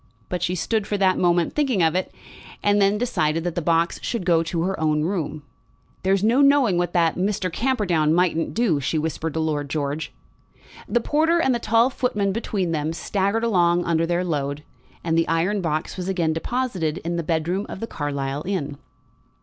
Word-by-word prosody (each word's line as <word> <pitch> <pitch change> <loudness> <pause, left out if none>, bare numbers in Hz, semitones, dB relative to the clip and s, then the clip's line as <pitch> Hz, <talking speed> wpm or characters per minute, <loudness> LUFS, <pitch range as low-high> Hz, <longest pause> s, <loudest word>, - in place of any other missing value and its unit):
But 180 -2 -3
she 180 +1 0
stood 210 +5 -1
for 205 - -1
that 190 -1 +2
moment 175 -1 +2
thinking 265 - +1
of 160 - +3
it, 185 +1 -1 0.5
and 205 0 +3
then 200 +1 +3
decided 165 -9 0
that 175 -1 -2
the 175 - -2
box 165 +1 +1
should 230 -7 -3
go 170 -2 +4
to 165 0 -2
her 190 +2 -2
own 155 -1 +1
room. 155 -4 -3 0.6
"There's 195 +1 +1
no 235 +6 +4
knowing 275 -10 +4
what 175 -1 -1
that 170 -2 +2
Mr. 185 -2 -1
Camperdown 190 - +1
mightn't 165 -1 +1
do," 215 -10 +2
she 145 +3 -1
whispered 160 0 -3
to - - 0
Lord 150 -3 -1
George. 145 +1 -3 0.8
The 240 - +2
porter 320 +6 +2
and 265 -6 +2
the 240 - 0
tall 230 +3 +3
footman, 210 -7 0
between 195 -4 -2
them, 155 0 -1
staggered 200 +5 -1
along 175 -5 +2
under 165 0 +1
their 175 +1 0
load, 145 -3 -2 0.4
and 165 -1 0
the 165 0 +2
iron 175 +5 +1
box 155 0 -2
was 185 0 -3
again 170 -4 0
deposited 180 -4 -2
in 170 +1 -1
the - - 0
bedroom 170 +5 -1
of - - -7
the 225 - -3
Carlisle 145 -4 -4
inn. 150 -8 -3
175 Hz, 190 wpm, -23 LUFS, 160-205 Hz, 0.8 s, go